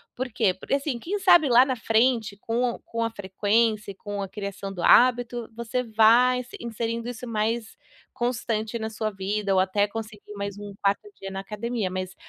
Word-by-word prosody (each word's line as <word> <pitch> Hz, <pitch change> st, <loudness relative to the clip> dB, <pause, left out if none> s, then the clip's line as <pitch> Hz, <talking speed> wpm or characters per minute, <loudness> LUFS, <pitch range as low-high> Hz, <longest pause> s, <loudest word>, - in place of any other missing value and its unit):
Por 250 Hz, -1 st, -4 dB
quê? 220 Hz, -5 st, +3 dB
Porque 190 Hz, -, -5 dB
assim, 275 Hz, -2 st, 0 dB
quem 370 Hz, -, -3 dB
sabe 350 Hz, -5 st, +6 dB
lá 245 Hz, 0 st, +7 dB
na 260 Hz, -1 st, -1 dB
frente 225 Hz, -2 st, +1 dB
com 240 Hz, +1 st, -1 dB
com 230 Hz, 0 st, -2 dB
a 230 Hz, -, -1 dB
frequência 210 Hz, +1 st, 0 dB
e -, -, -13 dB
com 205 Hz, +1 st, -6 dB
a 195 Hz, -, -3 dB
criação 200 Hz, 0 st, -6 dB
do 180 Hz, -, -6 dB
hábito, 240 Hz, 0 st, +4 dB
você 235 Hz, +2 st, -2 dB
vai 230 Hz, +3 st, +5 dB
inse 245 Hz, -1 st, -8 dB
inserindo 230 Hz, 0 st, -3 dB
isso 245 Hz, 0 st, -6 dB
mais 225 Hz, 0 st, -2 dB, 0.4 s
constante 235 Hz, -2 st, -2 dB
na 220 Hz, 0 st, -3 dB
sua 215 Hz, 0 st, -3 dB
vida, 200 Hz, +1 st, -1 dB
ou 190 Hz, -, +4 dB
até 200 Hz, +2 st, +2 dB
conseguir 215 Hz, -1 st, -8 dB
mais 200 Hz, -1 st, -5 dB
um 205 Hz, -1 st, -8 dB
4ª 200 Hz, -, +1 dB
dia 195 Hz, -, -5 dB
na 195 Hz, 0 st, -5 dB
academia, 210 Hz, 0 st, -3 dB
mas 185 Hz, 0 st, -4 dB
225 Hz, 190 wpm, -25 LUFS, 205-240 Hz, 0.4 s, lá